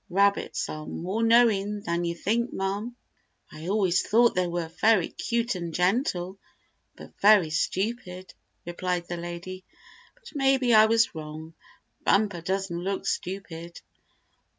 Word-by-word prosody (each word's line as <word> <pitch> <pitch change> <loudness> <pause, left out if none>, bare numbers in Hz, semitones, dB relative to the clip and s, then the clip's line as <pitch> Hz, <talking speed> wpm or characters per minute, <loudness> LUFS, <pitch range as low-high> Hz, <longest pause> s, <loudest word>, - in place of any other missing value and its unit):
Rabbits 200 +2 +1
are 155 0 -7
more 190 +6 -3
knowing 220 -3 +3
than 170 -4 -2
you 170 0 -2
think, 230 +7 -1
ma'm." 200 +5 -3 0.6
"I 155 +2 -9
always 190 -3 +2
thought 235 +2 +3
they 180 0 0
were 170 -1 -3
very 195 +2 +2
cute 235 0 -1
and 170 -3 -5
gentle, 185 -1 0 0.6
but - - -13
very 200 -6 +6
stupid," 185 +2 -3 0.3
replied 175 0 -3
the 175 - -4
lady. 175 +2 -7 0.5
"But - - -15
maybe 270 -4 +2
I 215 0 +7
was 230 +1 +3
wrong. 155 +1 -8 0.5
Bumper 200 -4 +2
doesn't 190 0 -2
look 195 +2 -3
stupid." 170 -3 -5
190 Hz, 130 wpm, -26 LUFS, 175-220 Hz, 0.6 s, I